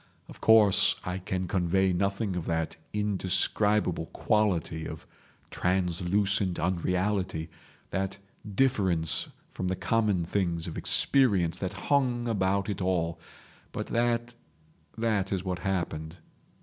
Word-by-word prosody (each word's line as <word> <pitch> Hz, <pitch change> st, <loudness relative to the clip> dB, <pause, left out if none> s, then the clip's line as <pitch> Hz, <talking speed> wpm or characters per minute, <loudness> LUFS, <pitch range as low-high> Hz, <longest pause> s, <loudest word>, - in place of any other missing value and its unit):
Of -, -, -13 dB
course, 110 Hz, -3 st, +5 dB
I 90 Hz, +1 st, -3 dB
can 90 Hz, 0 st, -3 dB
convey 95 Hz, +1 st, +2 dB
nothing 100 Hz, +2 st, -1 dB
of 90 Hz, -, -4 dB
that 80 Hz, -1 st, -1 dB, 0.2 s
indescribable 105 Hz, -2 st, +1 dB
quality 90 Hz, -7 st, 0 dB
of -, -, -8 dB, 0.5 s
translucent 95 Hz, +1 st, +1 dB
unreality, 90 Hz, -1 st, -1 dB, 0.4 s
that 95 Hz, 0 st, -2 dB, 0.4 s
difference 95 Hz, -, +1 dB, 0.2 s
from 95 Hz, -, -3 dB
the 95 Hz, -, 0 dB
common 95 Hz, -1 st, +1 dB
things 85 Hz, -3 st, -1 dB
of 85 Hz, -, -6 dB
experience 100 Hz, -12 st, +2 dB
that 95 Hz, 0 st, -3 dB, 0.2 s
hung 125 Hz, -4 st, +2 dB
about 100 Hz, -2 st, +1 dB
it 100 Hz, -2 st, -3 dB
all; 85 Hz, -3 st, 0 dB, 0.5 s
but -, -, -4 dB
that—that 110 Hz, -3 st, -3 dB
is 95 Hz, -2 st, -1 dB
what 90 Hz, -1 st, -2 dB
happened. 85 Hz, -4 st, -3 dB
95 Hz, 110 wpm, -28 LUFS, 85-105 Hz, 0.5 s, course